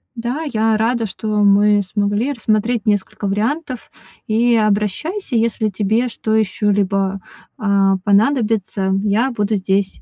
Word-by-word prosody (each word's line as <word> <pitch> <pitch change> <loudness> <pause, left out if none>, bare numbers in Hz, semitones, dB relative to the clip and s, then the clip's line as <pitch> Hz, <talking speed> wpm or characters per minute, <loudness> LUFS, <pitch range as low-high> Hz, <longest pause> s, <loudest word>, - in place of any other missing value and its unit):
Да, 245 +6 -3
я 220 -1 +1
рада, 230 +1 0
что 215 +1 -7 0.2
мы 205 +1 +4
смогли 205 +6 -1
рассмотреть 220 -1 -1
несколько 205 0 -1
вариантов, 250 +6 -3 0.3
и 235 +2 +2
обращайся, 220 - -1
если 225 -1 0
тебе 215 +5 0
что 220 -2 -3
еще-либо, 195 -2 0 0.4
а, 195 -2 +2
понадобится, 210 -3 +1
я 220 +6 +1
буду 215 -2 -1
здесь. 195 0 -1
215 Hz, 120 wpm, -18 LUFS, 200-230 Hz, 0.4 s, мы